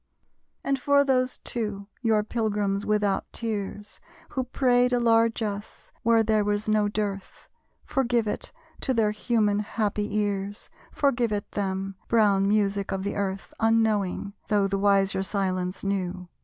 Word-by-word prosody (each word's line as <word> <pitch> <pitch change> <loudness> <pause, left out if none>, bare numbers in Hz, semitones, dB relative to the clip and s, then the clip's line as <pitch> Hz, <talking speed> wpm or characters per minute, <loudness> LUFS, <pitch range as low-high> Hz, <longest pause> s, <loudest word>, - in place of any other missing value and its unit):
And 275 -1 0
for 285 +2 +4
those 255 -2 +1
two, 210 -4 -4 0.2
your 220 -3 +2
pilgrims 210 -3 -1
without 210 -2 0
tears, 210 -2 -4 0.3
Who 260 -2 -2
prayed 250 -1 +2
a 245 - +3
largess 225 -3 0
where 230 0 +4
there 215 -1 +2
was 205 +1 -1
no 215 -1 +3
dearth, 205 -2 -4 0.4
Forgive 245 -3 +1
it - - -3 0.3
to 260 - -1
their 215 -2 +3
human 210 -1 +1
happy 210 -1 -1
ears: 205 0 -2 0.2
Forgive 245 -5 +1
it 205 -1 -3
them, 195 -1 -3
brown 205 -4 +3
music 200 -1 +1
of 190 0 -2
the 200 - -2
Earth, 195 -1 -3
Unknowing, 215 -3 +1
though 205 -2 +2
the 195 0 -1
wiser 195 -1 +3
silence 185 -2 -2
knew! 185 -2 -2
210 Hz, 140 wpm, -26 LUFS, 200-225 Hz, 0.4 s, for